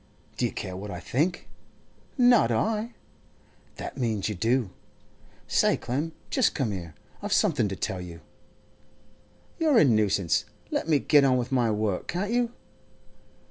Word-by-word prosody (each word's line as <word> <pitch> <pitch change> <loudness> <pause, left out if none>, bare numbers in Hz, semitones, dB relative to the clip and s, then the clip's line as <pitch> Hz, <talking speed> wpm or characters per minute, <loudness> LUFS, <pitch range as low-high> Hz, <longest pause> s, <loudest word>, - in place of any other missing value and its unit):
'Do - - +1
you - - -7
care 95 - -5
what 100 +3 -7
I 90 - -5
think?' 155 - -1 0.7
'Not 245 -2 +5
I!' 225 +2 -1 0.8
'That - - -7
means 110 -5 -1
you - - -2
do. 115 +2 0 0.8
Say, - - +3
Clem, 145 +7 -3 0.2
just 260 -5 +2
come 130 -7 0
here; 85 -5 -6 0.3
I've - - -5
something - - +2
to 95 - -4
tell 95 0 -3
you.' 85 -2 -9 1.4
'You're 310 -6 +4
a 160 - +7
nuisance. 105 -7 +2 0.3
Let - - -1
me 155 - +5
get 145 0 +4
on 130 -2 +4
with 125 +1 -3
my 125 -3 +2
work, 105 -3 -1
can't 195 +5 -2
you? 240 0 +1
125 Hz, 150 wpm, -27 LUFS, -, 1.4 s, a